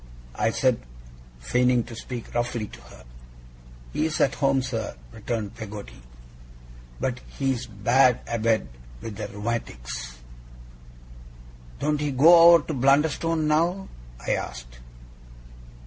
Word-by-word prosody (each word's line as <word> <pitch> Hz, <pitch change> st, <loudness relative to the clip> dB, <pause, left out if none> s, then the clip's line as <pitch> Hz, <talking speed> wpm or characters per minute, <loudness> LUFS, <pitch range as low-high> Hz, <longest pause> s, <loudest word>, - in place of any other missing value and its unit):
I -, -, +1 dB
said, -, -, +1 dB, 0.6 s
feigning 125 Hz, -, +2 dB
to 115 Hz, 0 st, -10 dB
speak 120 Hz, +1 st, -7 dB
roughly 120 Hz, -2 st, -1 dB
to -, -, -13 dB
her. -, -, -15 dB, 0.9 s
'He's 155 Hz, 0 st, -1 dB
at 135 Hz, -, +3 dB
home, 135 Hz, -2 st, +1 dB
sir,' 115 Hz, -4 st, -4 dB, 0.2 s
returned 110 Hz, -, -4 dB
Peggotty, 105 Hz, -, -9 dB, 1.0 s
'but 125 Hz, -1 st, -2 dB, 0.2 s
he's 130 Hz, -3 st, -1 dB
bad 120 Hz, +4 st, +3 dB
abed 115 Hz, -6 st, +1 dB, 0.3 s
with 105 Hz, -, -7 dB
the 110 Hz, -, -4 dB
rheumatics.' 100 Hz, -, -5 dB, 1.6 s
'Don't 150 Hz, -1 st, 0 dB
he 150 Hz, -, 0 dB
go 165 Hz, +5 st, +8 dB
over 165 Hz, -, +2 dB
to 160 Hz, -, -3 dB
Blunderstone 150 Hz, +4 st, +2 dB
now?' 170 Hz, +5 st, +1 dB, 0.4 s
I -, -, 0 dB
asked. -, -, -4 dB
120 Hz, 115 wpm, -25 LUFS, 110-145 Hz, 1.6 s, go